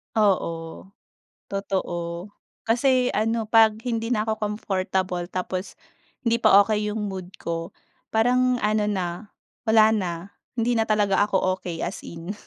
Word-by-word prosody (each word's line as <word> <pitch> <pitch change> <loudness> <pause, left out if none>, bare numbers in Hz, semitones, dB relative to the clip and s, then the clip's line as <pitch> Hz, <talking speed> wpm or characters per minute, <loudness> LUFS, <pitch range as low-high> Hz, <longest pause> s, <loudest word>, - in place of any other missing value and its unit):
Oo, 185 -4 0 0.6
totoo. 185 -1 -3 0.3
Kasi 250 +2 +2
ano, 225 +1 0
'pag 220 0 +5
hindi 230 -2 -1
na 220 -3 +1
ako 220 0 -2
comfortable 185 -4 -2
tapos 185 +1 -4 0.5
hindi 230 0 +2
pa 200 -3 +7
okay 210 0 0
'yong 210 0 -2
mood 190 -1 -6
ko, 165 0 -4 0.4
parang 250 +3 +3
ano 210 0 +2
na, 190 -4 -1 0.6
wala 220 0 +6
na, 190 -5 0 0.4
hindi 235 +1 +1
na 225 -1 +1
talaga 205 -2 +2
ako 185 -1 +1
okay 170 -2 -4
as - - -5
in. 170 +4 -7
210 Hz, 135 wpm, -24 LUFS, 185-225 Hz, 0.6 s, pa